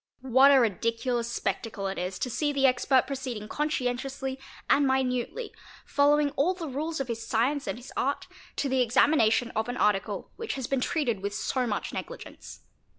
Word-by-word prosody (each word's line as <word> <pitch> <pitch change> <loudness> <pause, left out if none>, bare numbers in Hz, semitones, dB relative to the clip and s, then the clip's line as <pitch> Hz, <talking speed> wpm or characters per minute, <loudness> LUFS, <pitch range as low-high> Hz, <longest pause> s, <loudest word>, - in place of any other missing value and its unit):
What 265 +2 +6
a 275 - +7
ridiculous 230 +2 0
spectacle 220 -4 -3
it 195 0 -2
is 180 +1 -3
to 250 - -2
see 295 +5 0
the 275 -1 +2
expert 255 0 +3
proceeding 255 -6 -5
conscientiously 265 -1 -2 0.3
and 280 0 +4
minutely, 265 - -1 0.3
following 290 0 +3
all 340 +8 +1
the 340 -3 -5
rules 305 +4 -3
of 270 - -2
his 230 -1 -4
science 265 +7 0
and - - -2
his 245 +2 -11
art, 280 +2 -1 0.3
to 285 - -1
the 260 -1 +2
examination 245 -1 +3
of 220 +2 -2
an 245 - -3
.article 205 -1 0
which 455 - -4
has 265 -2 -3
been 270 +1 -1
treated 275 - 0
with 200 +1 -3
so 250 +3 -1
much 210 - -3
negligence. - - -8
260 Hz, 175 wpm, -28 LUFS, 230-280 Hz, 0.3 s, a